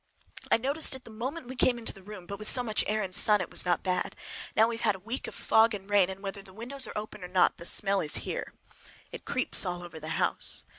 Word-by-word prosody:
I - - +4
noticed 275 +4 +3
it 260 - -11
the 230 - -12
moment 255 +8 -5
we 260 - -7
came 250 -1 +2
into 230 - -1
the 195 - -14
room, 190 -2 -10
but 200 +2 -7
with 215 - -3
so 250 - +3
much 215 -3 +1
air 215 0 0
and 185 -1 -6
sun 210 +2 +6
it 185 - -5
was - - +3
not 175 -1 +1
bad. 185 -1 -1 0.4
Now 220 +1 +5
we 230 0 -3
have - - -10
had 210 -3 +2
a - - -11
week 225 +7 -5
of - - -7
fog 220 0 +3
and 195 -1 -9
rain, 200 -3 +3
and 190 0 -8
whether 195 0 -5
the 190 -1 -15
windows 250 +5 +1
are - - -8
open 210 -2 -7
or - - -6
not, 180 0 +2
the 170 - -4
smell 195 -1 +2
is 150 - +1
here. - - -4 0.6
It - - -9
creeps 255 - +2
all 175 -2 -4
over 170 -2 -9
the 155 - -9
house. - - 0
210 Hz, 275 wpm, -28 LUFS, 190-230 Hz, 0.6 s, sun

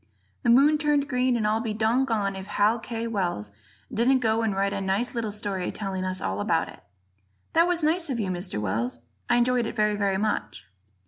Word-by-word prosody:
The - - 0
moon 285 +5 +5
turned 295 -2 +1
green, 250 -1 +1
and 220 - -1
I'll 215 +1 +2
be 225 -2 -3
doggone 220 -3 +1
if 190 0 -7
Hal 210 +3 +2
K. 230 0 -4
Wells 180 - -2 0.4
didn't 250 +4 +3
go 225 -2 +1
and 220 -3 0
write 200 +1 0
a 200 - -2
nice 195 +5 -1
little 230 -3 -2
story 200 -3 -3
telling 195 -3 -4
us 185 0 -1
all 95 +2 -2
about - - +1
it. - - -14 0.7
That 335 +1 +5
was 350 -2 0
nice 325 +1 +1
of 250 -3 -2
you, 195 -4 -1
Mr. 175 - -3
Wells; 115 +5 -2 0.3
I 240 - +4
enjoyed 245 -1 +2
it - - -6
very, 210 -2 +2
very 200 -2 0
much. 110 - -2
215 Hz, 205 wpm, -26 LUFS, 195-245 Hz, 0.7 s, moon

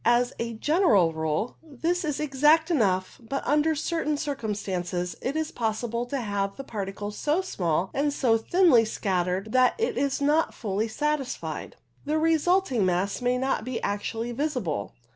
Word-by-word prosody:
As 240 +2 +3
a 230 0 -2
general 225 - +3
rule 160 +7 -2
this 325 +4 -2
is 300 -3 -2
exact 300 +3 +3
enough, 195 - +1
but 275 +4 -4
under 300 +3 +2
certain 305 0 -1
circumstances 195 - -3
it 275 - -2
is 315 0 -1
possible 235 +1 -2
to 275 +2 -2
have 200 -2 -2
the 275 - -7
particles 205 -2 -5
so 305 +5 +1
small, 180 - -1
and 290 +1 +1
so 250 -5 +2
thinly 255 +1 +4
scattered, 190 -1 -1
that 255 0 +4
it 455 - -1
is 275 -1 0
not 295 +3 +2
fully 210 +1 -1
satisfied. 295 +3 -3 0.3
The 305 +2 0
resulting 325 - +2
mass 185 +4 0
may 250 0 +1
not 265 -3 0
be 250 0 -3
actually 225 +3 -2
visible. 240 - -2
245 Hz, 155 wpm, -26 LUFS, 205-300 Hz, 0.3 s, thinly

